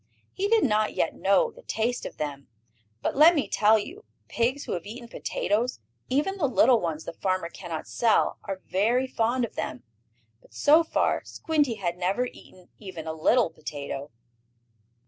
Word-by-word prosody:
He 395 Hz, +1 st, -1 dB
did 450 Hz, 0 st, +4 dB
not 215 Hz, -3 st, +1 dB
yet -, -, 0 dB
know -, -, +2 dB
the -, -, -16 dB
taste 240 Hz, -, -2 dB
of -, -, -12 dB
them. 140 Hz, -2 st, -5 dB, 0.6 s
But, -, -, -1 dB
let 315 Hz, +5 st, +7 dB
me 290 Hz, -, 0 dB
tell 215 Hz, +1 st, +4 dB
you, 335 Hz, -, -7 dB, 0.3 s
pigs 250 Hz, +5 st, 0 dB
who -, -, -6 dB
have 175 Hz, +1 st, -4 dB
eaten 235 Hz, +3 st, -8 dB
potatoes, 230 Hz, -, -1 dB, 0.3 s
even 300 Hz, +9 st, 0 dB
the 310 Hz, -7 st, +1 dB
little 245 Hz, -2 st, +4 dB
ones 160 Hz, -3 st, -3 dB
the 170 Hz, -, -7 dB
farmer 185 Hz, -1 st, -1 dB
cannot 170 Hz, -4 st, -6 dB
sell, 230 Hz, -2 st, +2 dB
are 195 Hz, -2 st, -5 dB
very 230 Hz, +7 st, +1 dB
fond 245 Hz, 0 st, 0 dB
of -, -, -11 dB
them. 125 Hz, -, -5 dB, 0.6 s
But, -, -, -22 dB
so 310 Hz, +3 st, +5 dB
far, 320 Hz, -, +1 dB
Squinty 295 Hz, -7 st, 0 dB
had 175 Hz, -4 st, -3 dB
never 190 Hz, +7 st, 0 dB
eaten 185 Hz, -6 st, -13 dB
even 185 Hz, -6 st, -8 dB
a 160 Hz, -, -3 dB
little 220 Hz, +10 st, +3 dB
potato. 145 Hz, -2 st, -6 dB
225 Hz, 170 wpm, -26 LUFS, 180-265 Hz, 0.6 s, let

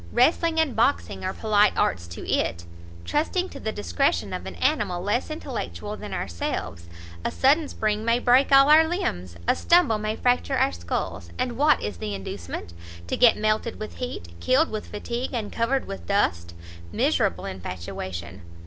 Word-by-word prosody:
Wrestling 320 Hz, +6 st, +3 dB
and 315 Hz, -6 st, +1 dB
boxing 240 Hz, +5 st, +1 dB
are 185 Hz, -, -1 dB
polite 210 Hz, 0 st, +2 dB
arts 85 Hz, -1 st, 0 dB
to 85 Hz, -, -8 dB
it! 85 Hz, +1 st, 0 dB, 0.4 s
trusting 360 Hz, +5 st, 0 dB
to -, -, -9 dB
the 220 Hz, -, -3 dB
discretion 85 Hz, -, 0 dB
of 90 Hz, +1 st, -5 dB
an 90 Hz, -, -7 dB
animal 175 Hz, -, 0 dB
less 210 Hz, +9 st, 0 dB
intellectual 255 Hz, -8 st, -5 dB
than 210 Hz, -, -8 dB
ourselves! 85 Hz, -1 st, -4 dB, 0.4 s
a -, -, 0 dB
sudden 290 Hz, +4 st, +3 dB
spring 215 Hz, -3 st, -1 dB
may 230 Hz, +1 st, +3 dB
break 250 Hz, +3 st, +4 dB
all 275 Hz, 0 st, +8 dB
our 315 Hz, +1 st, +8 dB
limbs, 90 Hz, -, -3 dB
a -, -, +4 dB
stumble 340 Hz, -11 st, +3 dB
may 215 Hz, +1 st, -2 dB
fracture 245 Hz, +1 st, +1 dB
our -, -, +3 dB
sculls! 85 Hz, 0 st, -4 dB
And 245 Hz, -2 st, -1 dB
what 295 Hz, +4 st, +3 dB
is 105 Hz, -3 st, -4 dB
the 100 Hz, +3 st, -4 dB
inducement? 90 Hz, -3 st, -6 dB, 0.3 s
to 85 Hz, -, -2 dB
get 240 Hz, -2 st, +5 dB
melted 215 Hz, +2 st, 0 dB
with 215 Hz, -, -7 dB
heat, 245 Hz, -, -5 dB
killed 280 Hz, +6 st, +2 dB
with 215 Hz, -1 st, -4 dB
fatigue, 240 Hz, +5 st, -4 dB
and 215 Hz, -3 st, -3 dB
covered 260 Hz, +4 st, 0 dB
with 195 Hz, -, -8 dB
dust! 85 Hz, -, 0 dB, 0.4 s
miserable 85 Hz, +1 st, +1 dB
infatuation! 90 Hz, 0 st, -6 dB
215 Hz, 165 wpm, -25 LUFS, -, 0.4 s, all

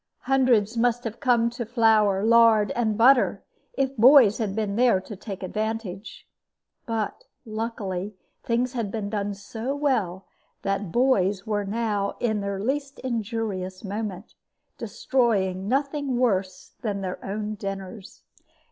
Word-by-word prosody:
Hundreds 245 Hz, -5 st, +2 dB
must 240 Hz, +1 st, +1 dB
have 225 Hz, -1 st, -5 dB
come 245 Hz, -4 st, +3 dB
to 240 Hz, +1 st, -4 dB
flour, 220 Hz, -4 st, +3 dB
lard, 225 Hz, -2 st, +5 dB
and 220 Hz, -3 st, 0 dB
butter 250 Hz, +2 st, +4 dB, 0.3 s
if 270 Hz, -, -1 dB
boys 245 Hz, -2 st, +7 dB
had 205 Hz, -4 st, -2 dB
been 210 Hz, -2 st, -1 dB
there 240 Hz, -4 st, +4 dB
to 190 Hz, +3 st, -9 dB
take 195 Hz, -1 st, -8 dB
advantage. 215 Hz, 0 st, -4 dB, 0.6 s
But 225 Hz, -3 st, -3 dB, 0.2 s
luckily 215 Hz, -3 st, -4 dB, 0.3 s
things 245 Hz, +2 st, 0 dB
had 230 Hz, -5 st, -2 dB
been 205 Hz, -1 st, -4 dB
done 205 Hz, -1 st, -2 dB
so 225 Hz, +6 st, -5 dB
well 215 Hz, -11 st, -1 dB, 0.4 s
that 195 Hz, -2 st, -2 dB
boys 200 Hz, -5 st, +2 dB
were 205 Hz, -2 st, -1 dB
now 205 Hz, -1 st, -1 dB
in 220 Hz, -3 st, 0 dB
their 200 Hz, -1 st, -3 dB
least 275 Hz, +5 st, -2 dB
injurious 220 Hz, -6 st, -3 dB
moment, 205 Hz, -1 st, -5 dB, 0.5 s
destroying 195 Hz, -7 st, 0 dB
nothing 275 Hz, +1 st, -1 dB
worse 195 Hz, -7 st, -1 dB
than 205 Hz, -3 st, -2 dB
their 185 Hz, -1 st, -5 dB
own 210 Hz, +2 st, -3 dB
dinners. 195 Hz, 0 st, -7 dB
220 Hz, 130 wpm, -25 LUFS, 200-240 Hz, 0.6 s, boys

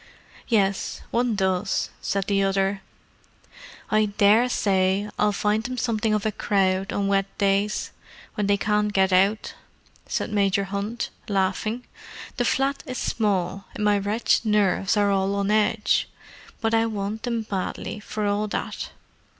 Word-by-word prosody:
"Yes, 200 Hz, -5 st, 0 dB
one 240 Hz, -1 st, +1 dB
does," 190 Hz, 0 st, 0 dB
said 195 Hz, 0 st, -1 dB
the 200 Hz, -1 st, +1 dB
other. 195 Hz, 0 st, +1 dB, 1.1 s
"I 215 Hz, 0 st, +4 dB
daresay 205 Hz, -2 st, +2 dB
I'll 210 Hz, 0 st, +3 dB
find 210 Hz, +1 st, +1 dB
them 255 Hz, +1 st, -4 dB
something 225 Hz, -2 st, 0 dB
of 210 Hz, -, -2 dB
a 215 Hz, -, +1 dB
crowd 195 Hz, -2 st, 0 dB
on 200 Hz, -, -1 dB
wet 195 Hz, 0 st, +2 dB
days, 200 Hz, +1 st, +1 dB, 0.4 s
when 205 Hz, -1 st, -1 dB
they 200 Hz, 0 st, +3 dB
can't 210 Hz, +1 st, +1 dB
get 190 Hz, -1 st, +2 dB
out," 200 Hz, +4 st, +2 dB, 0.5 s
said -, -, -2 dB
Major 200 Hz, -1 st, +2 dB
Hunt, 200 Hz, +4 st, -3 dB, 0.2 s
laughing. 200 Hz, +5 st, -1 dB, 0.5 s
"The 245 Hz, -, +1 dB
flat 270 Hz, +3 st, +1 dB
is 255 Hz, -1 st, -4 dB
small, 195 Hz, -4 st, -1 dB
and -, -, -3 dB
my 205 Hz, -1 st, +3 dB
wretched 210 Hz, +5 st, +1 dB
nerves 205 Hz, -2 st, +2 dB
are 205 Hz, -1 st, +3 dB
all 195 Hz, 0 st, +1 dB
on 200 Hz, 0 st, 0 dB
edge. 215 Hz, 0 st, +2 dB, 0.5 s
But 225 Hz, 0 st, 0 dB
I 225 Hz, 0 st, +3 dB
want 210 Hz, 0 st, -3 dB
them 235 Hz, -2 st, -2 dB
badly, 200 Hz, +1 st, -4 dB
for 210 Hz, +1 st, -4 dB
all 205 Hz, +1 st, 0 dB
that. -, -, -4 dB
205 Hz, 145 wpm, -24 LUFS, 195-215 Hz, 1.1 s, I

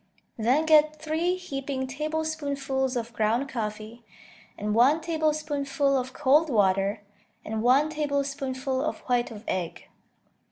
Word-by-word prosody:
Then 250 Hz, +8 st, +2 dB
get 310 Hz, -1 st, +4 dB
three 320 Hz, +4 st, 0 dB
heaping 275 Hz, -6 st, -4 dB
tablespoonfuls 280 Hz, -2 st, -2 dB
of 235 Hz, -1 st, -3 dB
ground 225 Hz, +5 st, +1 dB
coffee, 220 Hz, -1 st, -5 dB, 0.5 s
and 210 Hz, 0 st, -2 dB
one 260 Hz, +8 st, +5 dB
tablespoonful 300 Hz, -4 st, 0 dB
of 255 Hz, -1 st, -1 dB
cold 300 Hz, +4 st, +3 dB
water, 200 Hz, -2 st, +2 dB, 0.4 s
and 220 Hz, 0 st, -3 dB
one 270 Hz, +6 st, +4 dB
tablespoonful 275 Hz, -3 st, -2 dB
of -, -, -3 dB
white 245 Hz, -1 st, 0 dB
of 215 Hz, -2 st, -10 dB
egg. 180 Hz, -3 st, -4 dB
275 Hz, 120 wpm, -27 LUFS, 235-305 Hz, 0.5 s, one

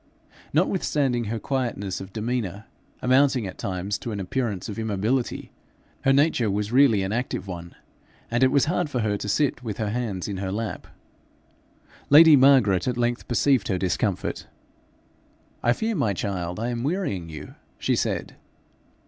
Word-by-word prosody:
Notwithstanding 135 Hz, -, +1 dB
her 115 Hz, +2 st, -3 dB
quietness 115 Hz, -7 st, -3 dB
of 95 Hz, 0 st, -9 dB
demeanour, 110 Hz, -2 st, -3 dB, 0.4 s
amounting 130 Hz, -2 st, +3 dB
at 95 Hz, -, -8 dB
times 95 Hz, +1 st, -3 dB
to 120 Hz, -, -5 dB
an 105 Hz, -, -4 dB
appearance 105 Hz, +1 st, -2 dB
of 105 Hz, -1 st, -6 dB
immobility, 110 Hz, +4 st, -1 dB, 0.5 s
her 135 Hz, -, +5 dB
nature 135 Hz, -5 st, +3 dB
was 105 Hz, +2 st, -2 dB
really 120 Hz, -6 st, +5 dB
an 95 Hz, -, -2 dB
active 120 Hz, -2 st, -2 dB
one, 85 Hz, -2 st, -8 dB, 0.6 s
and 120 Hz, +1 st, +1 dB
it 130 Hz, -, +7 dB
was 140 Hz, -1 st, +3 dB
hard 175 Hz, 0 st, 0 dB
for 125 Hz, -4 st, -1 dB
her 105 Hz, -1 st, 0 dB
to 105 Hz, -, -5 dB
sit 135 Hz, +3 st, +1 dB
with 110 Hz, -5 st, -5 dB
her 105 Hz, -2 st, -2 dB
hands 110 Hz, -6 st, -3 dB
in 100 Hz, -2 st, -4 dB
her 95 Hz, 0 st, -3 dB
lap. 110 Hz, +2 st, -4 dB, 1.2 s
Lady 155 Hz, +2 st, +9 dB
Margaret 130 Hz, -9 st, +4 dB
at 125 Hz, -1 st, -1 dB
length 120 Hz, 0 st, -1 dB
perceived 125 Hz, -1 st, +2 dB
her 95 Hz, -, 0 dB
discomfort. 90 Hz, -1 st, -2 dB, 1.1 s
'I 120 Hz, -, +3 dB
fear, 220 Hz, -, -2 dB
my 115 Hz, -, +1 dB
child, 90 Hz, -2 st, -3 dB
I 115 Hz, +2 st, -2 dB
am 120 Hz, -1 st, -3 dB
wearying 135 Hz, -, -2 dB
you,' 75 Hz, -2 st, -9 dB, 0.2 s
she -, -, 0 dB
said. -, -, -2 dB
115 Hz, 160 wpm, -25 LUFS, 100-130 Hz, 1.2 s, Lady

